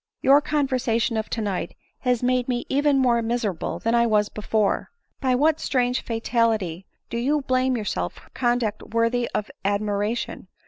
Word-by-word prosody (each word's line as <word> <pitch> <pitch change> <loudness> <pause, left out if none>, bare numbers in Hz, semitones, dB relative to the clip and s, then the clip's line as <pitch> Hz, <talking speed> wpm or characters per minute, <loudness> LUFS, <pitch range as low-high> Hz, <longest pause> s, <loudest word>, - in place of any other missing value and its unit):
Your 280 +2 +6
conver 285 -3 0
sation 230 0 +1
of 215 - -4
to 225 - -2
night 190 -5 -3 0.2
has 250 -2 0
made 250 0 +1
me 245 -1 -1
even 285 0 +3
more 245 -3 +3
miserable 225 -6 -2
than 230 - -1
I 235 0 +4
was 210 -2 +2
before. 215 -1 0 0.3
By 260 -2 +2
what 310 +4 +3
strange 250 -1 0
fatality 225 -6 0 0.2
do 235 - -1
you 290 +5 +1
blame 255 -1 +1
yourself 90 - -2
for - - -18
conduct 240 -4 0
worthy 230 +1 0
of 210 - -2
admiration 205 +2 -1
235 Hz, 165 wpm, -24 LUFS, 215-255 Hz, 0.3 s, Your